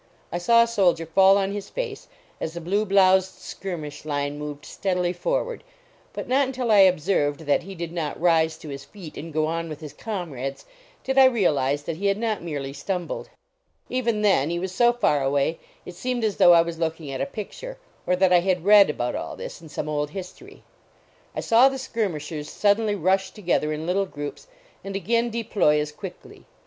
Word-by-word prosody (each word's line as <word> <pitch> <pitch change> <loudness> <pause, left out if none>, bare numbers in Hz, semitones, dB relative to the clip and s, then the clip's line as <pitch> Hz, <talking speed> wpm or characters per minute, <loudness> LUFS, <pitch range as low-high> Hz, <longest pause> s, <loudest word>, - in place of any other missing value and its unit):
I 175 - -2
saw 230 +6 +5
a - - -1
soldier 180 -7 +2
fall 190 +4 +5
on 195 0 0
his 200 -1 -6
face, - - -5 0.3
as 160 - -4
the - - -4
blue 195 +6 0
bloused 190 -1 +3
skirmish 160 -6 -7
line 145 -1 -2
moved 150 -1 -7
steadily 180 -2 -1
forward, - - -2 0.5
but - - -6
not 265 +2 +3
until 255 -3 -2
I 210 - +6
observed 165 -5 +3
that 145 -2 +1
he 195 +2 -9
did 170 -1 -5
not 165 -4 -4
rise 160 -2 +3
to 155 - -10
his 140 -1 -7
feet 185 -7 -11
and 165 +2 -7
go 155 0 +1
on 165 +1 -3
with 155 - -7
his 150 -3 -9
comrades 150 - -5 0.4
did 265 +1 +2
I 265 - +9
realize 145 - +2
that 160 +1 -4
he 200 +3 -1
had 200 0 +2
not 220 -2 -1
merely 145 -5 -5
stumbled. 175 +5 -4 0.6
Even 235 -4 0
then, 175 -8 +3
he 170 - -1
was 185 +1 -3
so 240 +5 +4
far 195 - +1
away, 140 +4 0 0.3
it 180 - -8
seemed 245 +6 -3
as 210 -3 0
though 175 - +7
I 165 -1 +6
was 170 -1 -6
looking 160 -3 -3
at 135 - -4
a - - -1
picture, 390 - -7 0.3
or 180 - +3
that 185 0 +3
I 175 - +7
had 180 -1 0
read 205 -2 +7
about 120 -4 -2
all - - -5
this - - -8
in 160 - -12
some 150 - -4
old 150 -1 -1
history. 195 - -10 0.7
I - - -2
saw 240 +4 +5
the 270 - -5
skirmishers 170 - -3
suddenly 210 0 +2
rush 190 +1 +1
together 175 -7 -1
in 155 +1 -4
little 195 +3 0
groups 145 -4 -7 0.4
and 195 0 -6
again 230 +5 +1
deploy 215 -9 +1
as 150 0 -2
quickly. 150 - -10
180 Hz, 200 wpm, -24 LUFS, 155-210 Hz, 0.7 s, I